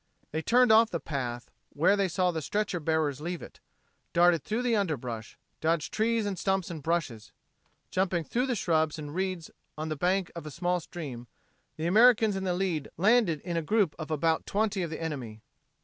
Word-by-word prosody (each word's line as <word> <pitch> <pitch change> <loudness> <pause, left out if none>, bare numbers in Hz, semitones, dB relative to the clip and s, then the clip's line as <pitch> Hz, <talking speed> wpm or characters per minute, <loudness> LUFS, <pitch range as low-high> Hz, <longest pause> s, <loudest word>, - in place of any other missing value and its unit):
They 160 - -2
turned 245 +6 +4
off 225 +1 +6
the 170 - -2
path 125 -6 -4 0.2
where 170 +7 +4
they 200 -1 +1
saw 180 +1 +1
the 160 -2 -3
stretcher 205 +3 -1
bearers 150 -3 0
leave 175 +2 -4
it, - - -12 0.5
darted 170 -3 +4
through 220 - -2
the 240 -2 +2
underbrush, 125 - -3 0.2
dodged 160 -1 0
trees 225 0 +1
and 195 -3 -3
stumps 190 -2 0
and 160 -3 -6
brushes. 140 -9 -2 0.6
Jumping 185 -2 0
through 245 - -1
the 250 - 0
shrubs 160 -5 +1
and 150 -1 -7
reeds 185 -2 -3 0.3
on 155 +1 -3
the 155 - -2
bank 180 +4 0
of 170 -2 -7
a - - -4
small 175 +3 -1
stream, 140 -8 -8 0.5
the 160 - -3
Americans 220 +2 +5
in 190 0 -3
the 180 -1 0
lead 175 -6 -1
landed 195 - +3
in 170 -2 -3
a - - +1
group 200 0 +2
of 155 - -5
about 160 +1 0
twenty 205 -1 0
of 170 - -2
the 155 - -5
enemy. 125 -10 -5
170 Hz, 195 wpm, -29 LUFS, 155-195 Hz, 0.6 s, off